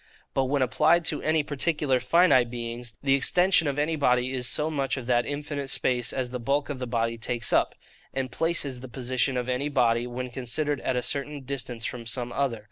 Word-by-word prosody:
But 135 - +1
when 135 0 +1
applied 160 +7 +3
to - - 0
any 155 0 +2
particular 145 -2 0
finite 130 -2 +4
beings, 120 0 -5
the 135 -1 +3
extension 175 +4 +4
of 140 -1 -1
any 150 +2 +1
body 125 -3 +2
is 125 -2 -2
so 150 +5 +1
much 140 -2 -1
of 130 - -5
that 120 -1 +2
infinite 145 -1 -4
space 125 -3 0
as 125 -2 -3
the 125 - -4
bulk 140 +5 0
of 140 -3 -4
the 125 - -4
body 115 -1 -1
takes 120 0 -2
up. - - +2 0.4
And 130 -1 -3
place 165 -1 0
is 130 -3 -3
the 130 - -8
position 130 +1 0
of 125 0 -2
any 130 +3 -1
body, 120 -3 +2
when 125 +1 -5
considered 140 +4 -2
at 130 - -1
a 125 - 0
certain 145 0 -3
distance 125 -3 -4
from 120 -2 -5
some 120 +1 -2
other. 135 -5 -1
130 Hz, 210 wpm, -26 LUFS, 125-145 Hz, 0.4 s, finite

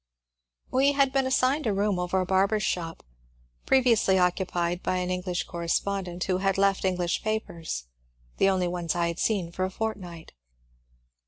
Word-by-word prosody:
We 275 +2 +3
had 275 -1 +2
been 270 -1 +2
assigned 260 +2 +2
a 210 - +1
room 200 -1 0
over 180 +1 0
a 185 - 0
barber's 195 +3 +2
shop, 165 -3 -3 0.6
previ 260 -2 +4
ously 195 -4 +3
occupied 180 -1 0
by - - -1
an 180 0 -2
English 180 -1 -2
correspondent, 175 +1 -2
who 185 -1 0
had 195 0 +1
left 195 0 +2
English 180 -2 0
papers, 170 - -3 0.5
the 195 - +4
only 185 -2 +1
ones 175 -2 -2
I 170 -1 +1
had 170 - -5
seen 190 -6 0
for 185 - -3
a 185 - 0
fortnight. 190 -5 -5
185 Hz, 165 wpm, -27 LUFS, 175-210 Hz, 0.6 s, previ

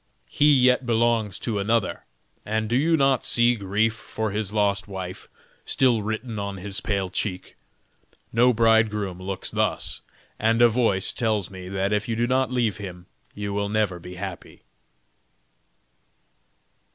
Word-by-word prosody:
He 150 +1 +4
yet 125 0 +4
belongs 115 -3 +1
to 110 -4 -2
another; 110 0 0 0.4
and 110 +1 -1
do 120 - 0
you 160 +5 +3
not 135 -3 +2
see 120 0 +4
grief 105 +1 0
for 110 -1 -4
his 105 -1 -2
lost 105 -1 0
wife 95 -2 -7 0.3
still 125 -4 +2
written 110 +1 -4
on 100 -1 -4
his 100 +1 -4
pale 100 -3 -1
cheek? 90 -1 -3 0.8
No 120 +2 +5
bridegroom 110 -5 +2
looks 95 0 -4
thus, - - -1 0.4
and 115 +1 +2
a 120 0 +7
voice 110 -5 +1
tells 110 -5 -1
me 95 -1 -8
that 95 +1 -1
if 105 +1 0
you 115 - -1
do 120 +1 +1
not 130 +1 +1
leave 115 -7 0
him, 90 -3 -8 0.3
you 100 -1 -4
will 100 0 -1
never 105 -4 0
be 90 +1 -10
happy." 95 -2 -8
105 Hz, 150 wpm, -24 LUFS, 100-115 Hz, 0.8 s, a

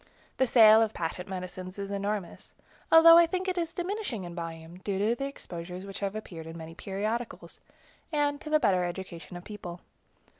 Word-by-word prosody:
The 260 - +3
sale 220 -2 +8
of 220 -1 0
patent 175 +2 -4
medicines 185 0 -6
is 200 0 -5
enormous, 200 -1 -4 0.4
although 330 +1 +10
I 340 - +6
think 370 +2 -2
it 370 - 0
is 335 -2 -2
diminishing 360 - -3
in 175 -1 -7
volume, 165 0 -7
due 195 0 -2
to 210 +4 +2
the 275 +3 -3
exposures 180 -7 -7
which 195 -1 -7
have 200 0 -2
appeared 170 -7 -7
in 165 +1 -8
many 165 0 -8
periodicals, 215 +6 -4 0.5
and 290 -2 0
to 305 - -7
the 305 0 +4
better 190 -9 +3
education 175 -1 -6
of 175 - -10
the - - -13
people. 180 -4 -7
200 Hz, 190 wpm, -29 LUFS, 180-260 Hz, 0.5 s, although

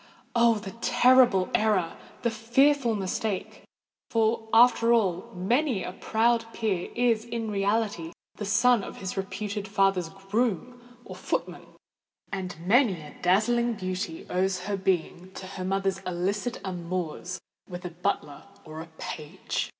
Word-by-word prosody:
Oh! 235 -1 +5
the 205 -2 -6
terrible 245 -7 +5
error—the 210 +2 0
fearful 235 +2 +3
mistake! 200 +1 -3 0.5
For, 225 0 +1
after 235 0 +6
all, 190 -6 +1
many 230 - +1
a - - -4
proud 230 +4 +1
peer 205 -6 -1
is 235 -2 +2
in 230 -2 -4
reality 200 -4 0 0.2
the 210 - -6
son 230 +2 +4
of - - -8
his 190 -1 -5
reputed 200 +1 -4
father's 195 -4 +2
groom 215 +5 -2 0.2
or - - -8
footman; - - -3 0.6
and 190 -3 -4
many 215 -3 +4
a 150 -1 -11
dazzling 235 +6 +2
beauty 185 -4 -4
owes 185 0 0
her 200 +2 -2
being 185 -1 -1
to 190 - -7
her 185 0 -6
mother's 195 +1 0
illicit 195 +7 -2
amours 180 0 -4 0.3
with 180 0 -7
a 175 - -4
butler 175 -4 -3 0.2
or 155 0 -7
a 165 - -10
page! 160 -5 -4
200 Hz, 135 wpm, -27 LUFS, 185-230 Hz, 0.6 s, after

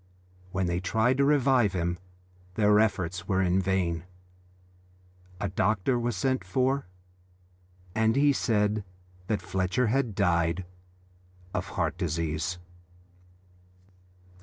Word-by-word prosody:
When 95 0 0
they 85 0 0
tried 110 +7 +1
to 140 - +3
revive 135 -7 +3
him 85 -1 -1 0.6
their 105 -1 +4
efforts 90 -5 0
were 95 -1 +1
in 90 +1 +2
vain. 90 -3 -1 1.3
A 100 - -1
doctor 100 +6 +1
was 120 -2 -1
sent 130 +4 0
for, 130 +6 0 1.1
and 110 +2 +2
he 145 +1 +4
said 105 -4 +1 0.4
that 105 -2 -1
Fletcher 95 +7 0
had 130 -6 0
died 85 -2 +1 0.9
of - - -2
heart 85 - -1
disease. 85 0 -2
100 Hz, 110 wpm, -28 LUFS, 90-120 Hz, 1.3 s, their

